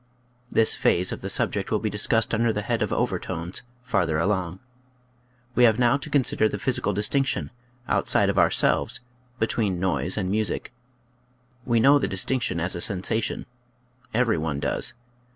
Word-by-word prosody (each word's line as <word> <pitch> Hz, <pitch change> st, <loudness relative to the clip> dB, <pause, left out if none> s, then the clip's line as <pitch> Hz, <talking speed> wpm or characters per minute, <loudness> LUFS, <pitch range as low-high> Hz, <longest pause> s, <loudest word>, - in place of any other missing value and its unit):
This 115 Hz, -, +4 dB
phase 90 Hz, +1 st, +2 dB
of -, -, -6 dB
the -, -, -5 dB
subject -, -, 0 dB
will -, -, +1 dB
be 110 Hz, -, -3 dB
discussed 115 Hz, +3 st, +1 dB
under 115 Hz, +1 st, +2 dB
the 105 Hz, -1 st, -3 dB
head 115 Hz, +1 st, -1 dB
of 105 Hz, -, -1 dB
overtones, 85 Hz, +2 st, -2 dB, 0.2 s
farther 95 Hz, -11 st, 0 dB
along. 90 Hz, 0 st, -1 dB, 0.9 s
We 125 Hz, -, +3 dB
have 110 Hz, -2 st, +4 dB
now 120 Hz, +2 st, +3 dB
to 150 Hz, -, -8 dB
consider 130 Hz, -6 st, +2 dB
the 105 Hz, -, -4 dB
physical 115 Hz, -1 st, 0 dB
distinction 115 Hz, +8 st, 0 dB, 0.2 s
— 125 Hz, 0 st, -33 dB
outside -, -, +2 dB
of -, -, +1 dB
ourselves -, -, +2 dB, 0.2 s
— -, -, -37 dB
between 105 Hz, -5 st, 0 dB
noise 90 Hz, -1 st, -1 dB
and 95 Hz, -3 st, -1 dB
music: 110 Hz, +2 st, -2 dB, 0.9 s
we 120 Hz, -2 st, +2 dB
know 140 Hz, +5 st, +5 dB
the -, -, -1 dB
distinction 95 Hz, 0 st, 0 dB
as 90 Hz, +2 st, 0 dB
a 85 Hz, -, -4 dB
sensation; 100 Hz, +4 st, -1 dB, 0.7 s
every 115 Hz, -6 st, +1 dB
one 75 Hz, -2 st, -3 dB
does. 70 Hz, -, +2 dB
105 Hz, 165 wpm, -24 LUFS, 90-120 Hz, 0.9 s, know